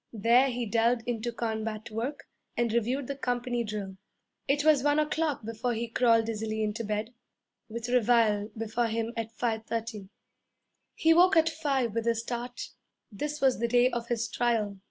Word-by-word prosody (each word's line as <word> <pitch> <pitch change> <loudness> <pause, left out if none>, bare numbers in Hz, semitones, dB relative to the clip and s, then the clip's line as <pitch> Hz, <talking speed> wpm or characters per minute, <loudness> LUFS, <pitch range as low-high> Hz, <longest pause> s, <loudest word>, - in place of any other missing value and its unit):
There 235 +5 +4
he 245 -1 -2
delved 230 +2 +2
into 240 0 -2
combat 220 -2 -4
work 240 +7 -4 0.3
and 235 -2 +1
reviewed 245 +4 0
the 280 - -4
company 245 -2 -1
drill. 205 -3 -5 0.5
It 290 +2 +1
was 305 -3 +5
one 290 +2 +2
o'clock 305 -4 0
before 230 +2 -2
he 235 +1 -2
crawled 230 -1 +3
dizzily 220 -1 -2
into 215 +2 -2
bed, 215 +2 -3 0.6
with 230 +1 -5
reveille 230 -4 +3
before 225 +2 -1
him 225 +1 -2
at 225 -1 -4
five 225 -2 -1
thirty. 225 -4 -4 0.9
He 325 0 +4
woke 360 +2 +5
at 325 0 +5
five 275 -8 -1
with 230 0 -2
a 230 - +3
start. 240 +2 -5 0.4
This 295 +9 -4
was 265 -4 +3
the 235 - +1
day 245 +2 +4
of 235 -1 -3
his 235 -1 -1
trial. 220 -5 0
235 Hz, 170 wpm, -29 LUFS, 220-250 Hz, 0.9 s, was